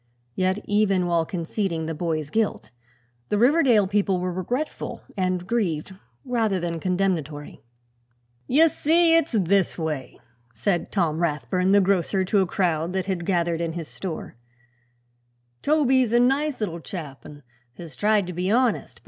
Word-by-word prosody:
Yet, 185 +6 0
even 200 -3 +2
while 170 -2 +1
conceding 170 -1 -2
the 160 - -3
boy's 155 -2 -3
guilt, 220 -2 -1 0.6
the 210 - +1
Riverdale 245 -3 +4
people 195 -1 +1
were 180 0 -2
regretful 245 - -4
and 185 -2 -1
grieved 190 -6 -1 0.3
rather 225 -6 0
than 170 -1 -3
condemnatory. 170 -5 -2 0.9
"Ye 315 +5 +5
see, 330 +2 +3
it's 330 -4 +1
this 195 -3 +2
way," 155 -6 -4 0.4
said 175 - -1
Tom 165 -5 0
Rathbun 175 +3 0
the 200 0 +6
grocer 190 0 +1
to 200 +2 +2
a 190 - +2
crowd 170 -2 0
that 190 -1 -1
had 185 -3 -3
gathered 170 -3 0
in 165 -1 -2
his 165 -2 -5
store; 180 -5 -6 1.3
"Toby's 265 -5 +2
a 240 - +5
nice 270 +2 +1
little 170 -5 -2
chap 155 -5 -8
an' 145 -1 -12 0.3
has 170 -3 -9
tried 210 -1 +2
to 180 - -6
be 180 +2 -2
honest. 245 +2 +1
185 Hz, 150 wpm, -24 LUFS, 170-215 Hz, 1.3 s, the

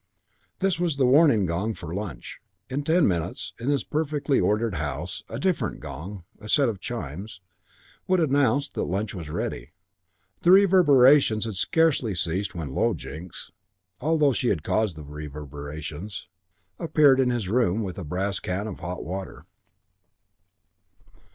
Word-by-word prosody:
This 190 -3 0
was 170 -5 0
the 135 - +3
warning 130 - +5
gong 95 +6 -1
for 85 -3 -7
lunch. 90 - -6 0.3
In 140 +3 -1
ten 160 +4 +3
minutes, 85 -4 -2
in 120 - -5
this 140 -2 +1
perfectly 150 -2 0
ordered 110 +1 +1
house, 80 +2 -4
a 115 - -5
different 180 +6 -1
gong, 95 +3 -8 0.2
a 105 +1 -9
set 140 +2 +4
of 105 -4 -5
chimes, 95 - -6 0.7
would 185 0 +3
announce 140 -3 +2
that - - -4
lunch 100 +3 -2
was 85 -6 -7
ready. - - -4 0.7
The 175 - +2
reverberations 145 - +6
had 110 - -4
scarcely 135 - +1
ceased 90 +4 -1
when 75 -6 -5
Low - - +1
Jinks, 80 +5 -9 0.5
although 150 -1 +2
she 125 - -1
had 80 -10 0
caused 110 -6 0
the 75 - -9
reverberations, 75 +5 -7 0.5
appeared 150 -5 +4
in 130 -2 +3
his 120 -6 -1
room 110 -1 +1
with 95 -1 -5
a - - -5
brass 95 +5 -2
can 95 +3 -3
of 105 -4 -6
hot 90 +1 -5
water. 95 +4 -6
105 Hz, 150 wpm, -25 LUFS, 90-140 Hz, 0.7 s, reverberations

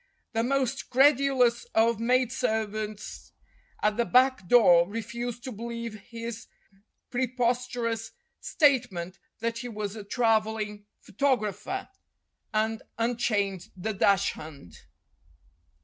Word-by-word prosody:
The 225 - +1
most 265 +1 -1
credulous 265 -3 +4
of 225 0 +3
maid 250 +1 +2
servants 215 -4 -3 0.5
at 210 0 +2
the 235 - +2
back 255 -5 +3
door 180 -6 +6
refused 235 +2 -5
to 260 - -5
believe 230 0 -5 0.2
his 230 -1 -6 0.6
preposterous 245 -2 -1 0.3
state 270 -6 +3
ment 180 +1 -6 0.2
that 230 0 -2
he 245 0 -5
was 210 -2 -4
a 215 - -7
travelling 215 -2 0
photographer, 265 - -1 0.6
and 220 +1 0 0.2
un 230 +1 0
chained 200 -6 -1
the 215 +4 -3
dachshund. 185 - 0
230 Hz, 105 wpm, -27 LUFS, 210-245 Hz, 0.6 s, door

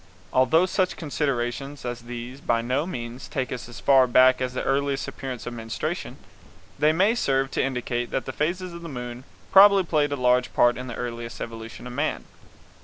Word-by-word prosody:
Although 145 +7 +4
such 185 0 0
considerations 140 -2 -2
as 120 -1 -4
these 120 +2 -7
will - - -20
by 115 -1 +3
no 130 +7 0
means 120 -5 -6
take 130 -2 -3
us 125 -1 -6
as 120 - -9
far 135 -2 +5
back 130 +1 +5
as 125 -1 -1
the - - -2
earliest 140 0 0
appearance 130 -3 -6
of 120 - -5
menstruation, 115 -1 -4 0.6
they 150 - +5
may 190 +7 +3
serve 135 - 0
to - - 0
indicate 125 -2 -2
that 130 - -2
the 130 - -5
phases 175 +4 -2
of 170 - -8
the 170 - -7
moon 125 -1 -7 0.3
probably 195 0 +8
played 150 -4 +1
a - - 0
large 125 -1 +2
part 120 0 +5
in 125 0 -6
the 125 - -6
earliest 115 -1 -5
evolution 115 0 -7
of 125 - -7
man. 145 +5 -2
130 Hz, 195 wpm, -25 LUFS, 120-145 Hz, 0.6 s, probably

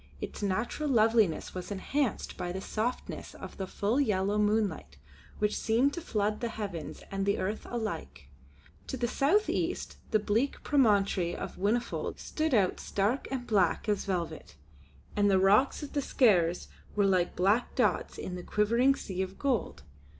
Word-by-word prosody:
Its - - -6
natural 220 +9 -1
loveliness 220 - +3
was 180 -1 -6
enhanced 225 +5 -2
by 175 - -4
the 190 - -4
softness 225 +5 -4
of - - -9
the 190 - -4
full 210 +8 0
yellow 205 -4 +1
moonlight 210 - 0 0.4
which 210 0 0
seemed 240 +6 +2
to 340 - -4
flood 210 -7 -1
the 235 - -1
heavens 200 -8 -6
and 195 0 -1
the 200 +1 +1
earth 205 +4 -3
alike. 205 - -5 0.6
To 265 - -4
the 240 -1 0
south 325 - +2
east - - -2
the 215 - +4
bleak 220 +6 0
promontory 200 - +2
of - - -6
Whinnyfold 215 +6 -1
stood 310 -3 -1
out 195 -4 +2
stark 205 +7 -1
and 260 -2 -3
black 200 -3 +2
as 210 -1 0
velvet 180 -4 -3 0.6
and 205 0 +3
the 195 - +4
rocks 205 +11 +4
of 290 - -8
the 285 - +1
Skares 180 - +3 0.3
were 205 -1 +3
like 185 -3 +2
black 200 +7 +2
dots - - +1
in 180 - -5
the 180 - -5
quivering 235 +8 +2
sea 190 -6 -4
of 190 0 -4
gold. 250 - -1
210 Hz, 165 wpm, -30 LUFS, 190-240 Hz, 0.6 s, the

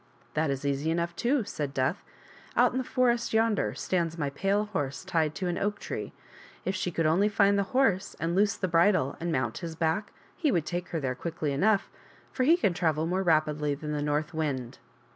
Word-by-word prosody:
" - - -32
That 155 0 +1
is 135 0 -2
easy 140 +2 0
enough, 170 +1 -1
too," 250 +6 +1
said 145 -7 -4
Death; 130 +7 0 0.3
" - - -23
out - - +5
in 255 - -1
the - - -1
forest 240 -2 +1
yonder 215 - +2
stands 170 +1 -1
my 145 -3 -1
pale 195 +7 +1
horse 145 -7 -3
tied 160 -4 0
to 190 - -3
an 175 - -1
oak 205 +1 -1
tree. - - -5 0.5
If 190 - 0
she 185 - -1
could 165 -1 -1
only 180 +7 +3
find 200 -1 +4
the 200 - +3 0.2
horse 200 -8 +2
and 165 +1 -1
loose 200 +1 +3
the 185 - -1
bridle 175 +3 +3
and 170 0 -2
mount 130 -6 -1
his 165 -2 -6
back 165 +5 -1 0.2
he 305 -5 +1
would 165 -7 +1
take 175 0 -3
her 165 - -3
there 135 -3 -1
quickly 155 +2 -3
enough, 195 +9 +2 0.4
for 255 - 0
he 330 +5 +6
can 200 - +1
travel 160 -3 0
more 185 +3 0
rapidly 155 -4 +2
than 150 +1 -6
the 150 -1 -1
north 150 +2 -1
wind." 135 -6 -3
170 Hz, 220 wpm, -28 LUFS, 150-200 Hz, 0.5 s, he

